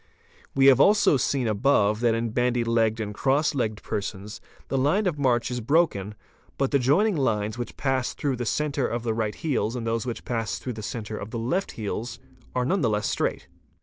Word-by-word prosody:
We 135 0 +4
have 135 -2 +7
also 205 -6 +5
seen 130 -1 0
above 105 -1 +2
that 115 -1 +2
in 115 0 -2
bandy 120 +1 +1
legged 115 -1 +1
and 105 -2 -3
cross 140 +8 +1
legged 110 -6 -2
persons 100 0 -5 0.3
the - - -3
line 175 +11 +2
of 165 -6 -1
march 125 -3 +1
is 125 -1 -3
broken, 110 - +1 0.4
but 135 -1 0
the 140 - +3
joing 175 - +3
lines 110 -7 0
which 120 - -6
pass 135 -3 -1
through 135 -3 -1
the 120 - -3
centre 145 -1 0
of 115 0 -3
the 115 -2 0
right 110 -2 -2
heels 130 -7 -1
and 120 -2 -4
those 115 +2 -1
which 120 - -5
pass 115 -3 -2
through 125 - -5
the 110 - -7
centre 110 0 -5
of 100 - -7
the 115 - -5
left 130 +13 -1
heels 115 +2 -4 0.4
are 125 -1 +1
none 185 +7 +1
the 115 - +2
less 105 -1 0
straight. - - -2
120 Hz, 210 wpm, -25 LUFS, 110-140 Hz, 0.4 s, have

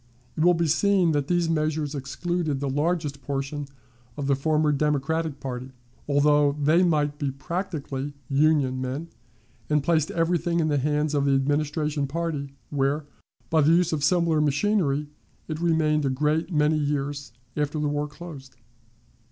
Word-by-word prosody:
It 155 - 0
will 175 0 +5
be 170 0 +1
seen 180 +2 +3
that 145 -2 0
these 175 -1 +1
measures 155 -2 0
excluded 150 +2 -2
the 140 - -2
largest 150 -1 -1
portion 140 +2 -3 0.5
of 145 - -3
the 140 0 +3
former 150 +2 +1
Democratic 150 +1 0
party, 130 0 -6 0.4
although 145 0 +4
they 150 +4 +3
might 150 -4 +1
be 145 -3 0
practically 145 -2 -4
"Union" 140 -2 +2
men, 135 +6 -4 0.6
and 150 -2 +2
placed 160 -1 +2
everything 170 0 0
in 155 -1 +1
the 145 -1 +2
hands 150 +2 0
of 140 -1 +1
the 140 -1 +3
Administration 145 +1 0
party, 145 -2 -3 0.2
where, 145 +1 0 0.5
by 160 -1 +4
the 155 +3 +5
use 170 -1 +3
of 150 -2 -1
similar 165 -1 +3
machinery, 150 -1 +1 0.4
it 155 -1 -4
remained 155 -3 +2
a 135 - +1
great 150 +6 0
many 150 -1 +2
years 145 -1 -2 0.2
after 150 0 -1
the 150 - 0
war 145 0 -1
closed. 150 -5 -11
150 Hz, 155 wpm, -25 LUFS, 140-160 Hz, 0.6 s, will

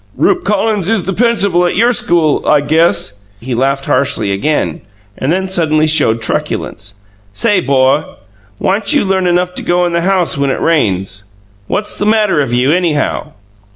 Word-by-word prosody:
"'Rupe 365 -1 +1
Collins 210 -2 0
is 225 -5 0
the 195 - -2
principal 200 -6 +1
at - - -2
your 235 +5 +3
school, 165 -8 +1
I 150 - +4
guess!'" 155 -8 +1 0.2
He 125 +3 -5
laughed 135 +3 -1
harshly 130 -6 0
again, 100 - -1 0.3
then 180 +8 -1
suddenly 155 -4 +1
showed 115 -8 +2
truculence. 100 -2 -3 0.3
"Say, 210 - +1
'bo, 135 +1 +1 0.4
whyn't 200 - 0
you 290 - +2
learn 190 -1 0
enough 180 +1 0
to - - -2
go 175 0 +1
in 175 - -2
the 170 - +1
house 180 -5 0
when 140 0 +1
it - - -2
rains? 95 - -1 0.4
What's 210 +1 -3
the 205 - 0
matter 210 -7 +2
of 135 -4 -2
you, 125 +3 +2
anyhow?" 165 -4 -1
165 Hz, 165 wpm, -13 LUFS, 135-190 Hz, 0.4 s, I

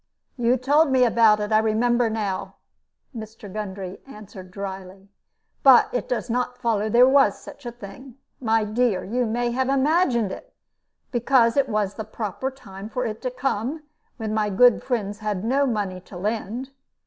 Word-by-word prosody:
"You 245 0 +2
told 290 +5 +3
me 260 -1 +4
about 225 -2 +4
it, 210 +1 -3
I 215 - +5
remember 235 +2 +1
now," 210 -4 -3 0.6
Mr. 220 -3 -9
Gundry 195 -3 -6
answered, 205 -6 -11
dryly; 195 0 -8 0.5
"but 265 -3 +7
it 245 - -3
does 245 - -2
not 250 +1 -2
follow 225 -4 0
that 215 - -3
there 245 +2 +7
was 265 -6 +4
such 280 - -11
a - - -4
thing. 240 +3 -12 0.2
My 225 -3 +1
dear, 215 -2 0
you 240 +4 -1
may 240 +2 -1
have 260 +2 -1
imagined 270 - +2
it; - - -10 0.6
because 240 -1 +3
it 275 -2 +2
was 210 -2 -1
the 220 - -6
proper 215 +3 -4
time 210 -6 -11
for 250 +2 -3
it 220 -1 -5
to 255 - -2
come, 255 +3 -3 0.3
when 220 -3 -4
my 215 -1 0
good 245 +4 +4
friends 210 -5 -3
had 210 -3 -3
no 270 +5 +1
money 205 -6 -2
to 185 - -12
lend. 225 +6 -3
225 Hz, 170 wpm, -23 LUFS, 210-250 Hz, 0.6 s, but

